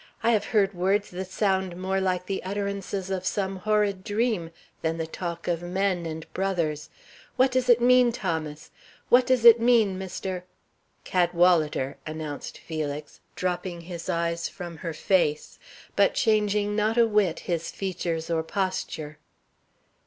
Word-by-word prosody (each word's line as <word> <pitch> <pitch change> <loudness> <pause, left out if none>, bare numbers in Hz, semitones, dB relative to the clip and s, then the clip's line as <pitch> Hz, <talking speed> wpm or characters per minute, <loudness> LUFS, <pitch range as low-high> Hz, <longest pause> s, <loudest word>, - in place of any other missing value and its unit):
"I 230 - +4
have 215 -3 +2
heard 205 -3 +2
words 195 +3 0
that 185 +1 -5
sound 190 -2 0
more 190 +1 -1
like 180 -1 0
the 195 0 -3
utterances 200 -1 -3
of 190 -1 -2
some 190 0 -1
horrid 205 -1 +1
dream 210 -5 0 0.3
than 165 0 -1
the 165 - -2
talk 170 +1 -6
of 170 -1 0
men 180 -1 -1
and 160 0 -6
brothers. 170 -6 -1 0.5
What 260 +1 +4
does 255 0 0
it 240 -1 +7
mean, 250 0 +5
Thomas? 160 -8 -4 0.4
What 250 +1 +5
does 255 -2 +2
it 235 0 +10
mean, 225 -5 +3
Mr. 190 -1 -4 0.3
" - - -42
"Cadwalader," 170 -6 +2
announced 155 -2 -6
Felix, 150 -2 -5 0.2
dropping 180 -1 -3
his 170 0 -7
eyes 170 0 -1
from 175 -2 -8
her 165 +1 -5
face, 155 -4 0 0.4
but - - +3
changing 210 -2 +2
not 215 +2 +1
a 235 - +6
whit 210 -6 +1
his 170 -2 -2
features 170 -4 -3
or 165 -1 +1
posture. 160 -4 -3
185 Hz, 150 wpm, -26 LUFS, 170-205 Hz, 0.5 s, it